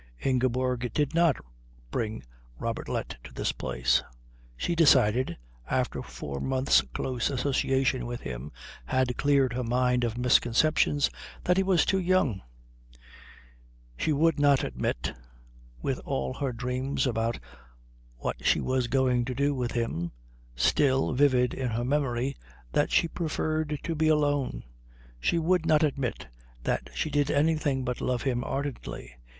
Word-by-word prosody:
Ingeborg 125 -1 +1
did 145 0 +1
not 170 -4 +4 0.6
bring 110 -1 -3 0.4
Robertlet - - -3
to - - -11
this - - -1
place. - - +1 0.6
She 170 - -1
decided, 130 - +4 0.3
after - - 0
four 70 -1 -6
months' 130 - +3
close 125 - -1
association 130 -1 +1
with 120 0 -5
him 65 +3 -6 0.3
had 125 - +1
cleared 140 -3 +2
her 125 +1 -2
mind 125 +1 +1
of 115 -1 -1
misconceptions, 125 +4 +3 0.3
that 180 +1 +2
he - - +5
was 190 -3 +3
too 195 - +2
young. 175 - +1 1.5
She 155 - 0
would 160 +1 +2
not 145 -2 +4
admit, - - -2 0.7
with - - -1
all 65 -1 -2
her 135 -2 -2
dreams 125 +4 -2
about 115 -2 0 0.8
what - - -4
she - - +3
was 130 -1 0
going 125 -1 +2
to 130 0 -4
do 140 +2 +1
with 125 -3 -2
him 85 -8 -2 0.4
still 135 - +2
vivid 125 -2 +3
in 130 -2 -2
her 115 +1 -2
memory, 135 -1 0 0.4
that - - +2
she - - +3
preferred 155 -2 -2
to 165 - -2
be 160 0 +1
alone. 145 -3 +1 0.6
She 115 - +1
would 165 0 +2
not 155 -1 +4
admit 135 - -1 0.4
that - - -1
she 155 - -1
did 145 0 +1
anything 145 -3 +1
but 125 0 -3
love 125 -1 -1
him 125 -3 0
ardently. 135 - -5
130 Hz, 140 wpm, -28 LUFS, 120-145 Hz, 1.5 s, he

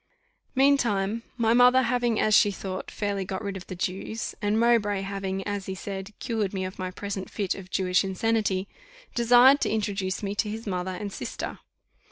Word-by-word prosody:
Meantime 230 -6 +2 0.2
my 230 -1 +3
mother 250 +2 +6
having, 240 -2 +1
as 215 - +2
she 205 +1 +6
thought, 190 -1 -5
fairly 200 -2 -2
got 190 +3 -5
rid 200 -1 -3
of 190 - -8
the 185 - -6
Jews, 190 +5 -3
and 210 +2 +1
Mowbray 220 -4 +3
having, 195 -1 -3
as 205 -2 -3
he 190 - -3
said, 195 +1 -6
cured 215 -4 -2
me 185 -1 -1
of 185 +1 -7
my 185 0 -2
present 195 0 -5
fit 200 -3 -1
of 185 -2 -10
Jewish 185 0 +2
insanity, 195 0 0 0.5
desired 245 +4 +6
to - - +1
introduce 200 -3 -2
me 200 0 -2
to 210 +1 -1
his 220 +2 -6
mother 185 -2 -2
and 200 +1 -5
sister. - - -5
200 Hz, 185 wpm, -26 LUFS, 190-225 Hz, 0.5 s, mother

